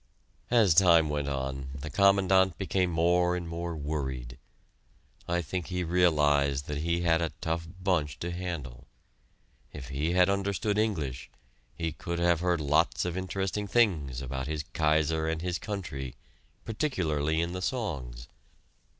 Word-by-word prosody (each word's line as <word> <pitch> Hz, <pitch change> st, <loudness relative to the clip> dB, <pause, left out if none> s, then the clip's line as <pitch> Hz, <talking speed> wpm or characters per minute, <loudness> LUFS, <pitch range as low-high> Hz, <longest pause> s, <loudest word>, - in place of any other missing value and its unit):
As 110 Hz, -7 st, +5 dB
time 85 Hz, -3 st, +6 dB
went 75 Hz, -1 st, -2 dB
on, 65 Hz, -1 st, -3 dB
the 70 Hz, +2 st, -6 dB
Commandant 95 Hz, -1 st, +4 dB
became 95 Hz, -2 st, 0 dB
more 90 Hz, +1 st, +2 dB
and 90 Hz, -1 st, -4 dB
more 85 Hz, 0 st, -4 dB
worried. 65 Hz, -5 st, -4 dB, 0.9 s
I 85 Hz, 0 st, 0 dB
think 85 Hz, +3 st, -4 dB
he 90 Hz, 0 st, -2 dB
realized 75 Hz, -5 st, +2 dB
that 75 Hz, -1 st, -4 dB
he 85 Hz, +2 st, 0 dB
had 85 Hz, -1 st, +2 dB
a 85 Hz, -, -2 dB
tough 80 Hz, 0 st, -2 dB
bunch 85 Hz, -7 st, 0 dB
to 85 Hz, -, -3 dB
handle. 85 Hz, -9 st, -6 dB, 0.8 s
If 65 Hz, -2 st, -9 dB
he 75 Hz, +5 st, -1 dB
had 90 Hz, 0 st, +5 dB
understood 100 Hz, +1 st, 0 dB
English, 80 Hz, -, -2 dB, 0.5 s
he 80 Hz, -1 st, -2 dB
could 85 Hz, +3 st, -5 dB
have 85 Hz, -1 st, +3 dB
heard 90 Hz, -1 st, +1 dB
lots 75 Hz, +4 st, +2 dB
of 90 Hz, -1 st, -2 dB
interesting 95 Hz, +2 st, -2 dB
things 80 Hz, -, +1 dB
about 65 Hz, +1 st, -4 dB
his 75 Hz, -1 st, -3 dB
Kaiser 80 Hz, 0 st, +2 dB
and 80 Hz, +1 st, -2 dB
his 90 Hz, -1 st, -2 dB
country 70 Hz, -, -5 dB, 0.5 s
particularly 80 Hz, -, 0 dB
in 85 Hz, +1 st, -1 dB
the 90 Hz, -, -4 dB
songs. 70 Hz, -, -3 dB
85 Hz, 145 wpm, -29 LUFS, 75-90 Hz, 0.9 s, time